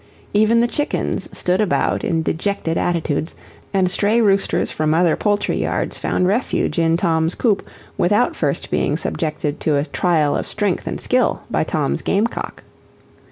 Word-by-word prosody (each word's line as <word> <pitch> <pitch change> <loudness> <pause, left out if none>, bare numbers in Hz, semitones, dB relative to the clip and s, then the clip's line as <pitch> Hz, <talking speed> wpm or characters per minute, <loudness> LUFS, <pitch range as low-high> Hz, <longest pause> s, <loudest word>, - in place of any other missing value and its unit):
Even 215 +3 +4
the 240 - +3
chickens 295 +4 -2
stood 180 +3 0
about 210 - 0
in 165 -1 0
dejected 165 0 -1
attitudes, 165 -3 -1 0.4
and 185 -2 +2
stray 210 +4 +2
roosters 200 -3 +2
from 155 0 0
other 170 -1 +3
poultry 205 -1 0
yards - - -2
found 180 - 0
refuge 205 -2 0
in 165 0 +3
Tom's 165 -2 +1
coop 215 -5 +1 0.4
without 210 +7 +2
first - - -2
being - - +1
subjected 150 -2 -3
to 150 -2 +1
a 140 - 0
trial 160 -5 +1
of - - -2
strength - - -2
and - - -3
skill - - +1
by - - +1
Tom's 70 +1 -1
game 200 +3 +1
cock. 235 - -5
180 Hz, 160 wpm, -20 LUFS, 160-205 Hz, 0.4 s, Even